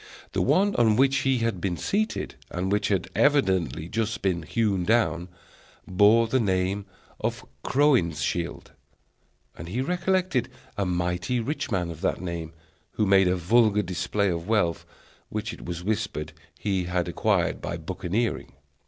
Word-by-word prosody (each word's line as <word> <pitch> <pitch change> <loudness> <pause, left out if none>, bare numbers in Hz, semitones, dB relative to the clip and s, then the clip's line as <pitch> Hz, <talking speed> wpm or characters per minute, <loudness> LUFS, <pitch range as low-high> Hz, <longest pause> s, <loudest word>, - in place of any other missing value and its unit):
The - - 0
one 200 +1 +3
on 110 -3 +4
which 135 +2 +4
he 135 -1 +2
had 95 -6 -2
been 90 -2 -1
seated, 215 +2 -1 0.2
and 90 +2 -2
which 105 0 +1
had 95 -3 0
evidently 95 - +2
just 110 +1 -2
been 90 -3 +1
hewn 95 +2 0
down, 90 -5 +1 0.6
bore 105 +5 +5
the 130 +4 +1
name 95 -1 0 0.3
of - - -3 0.2
Crowninshield; 85 - +1 0.8
and 85 - -8
he 115 +8 -3
recollected 180 -3 0 0.3
a 100 -2 -1
mighty 90 +7 -1
rich 145 +6 -3
man 90 -6 -1
of 80 0 -10
that 95 - 0
name, 85 -3 -5 0.4
who 105 - +1
made 95 -1 +5
a 90 - +2
vulgar 105 +3 +3
display 95 +3 -1
of 85 +1 -4
wealth, 105 -7 +1 0.4
which 110 0 -4
it - - -10
was 85 0 -5
whispered 75 -7 -2 0.2
he 95 -3 -1
had 90 -1 -1
acquired - - 0
by - - -4
buccaneering. 110 +6 -2
100 Hz, 150 wpm, -26 LUFS, 90-115 Hz, 0.8 s, bore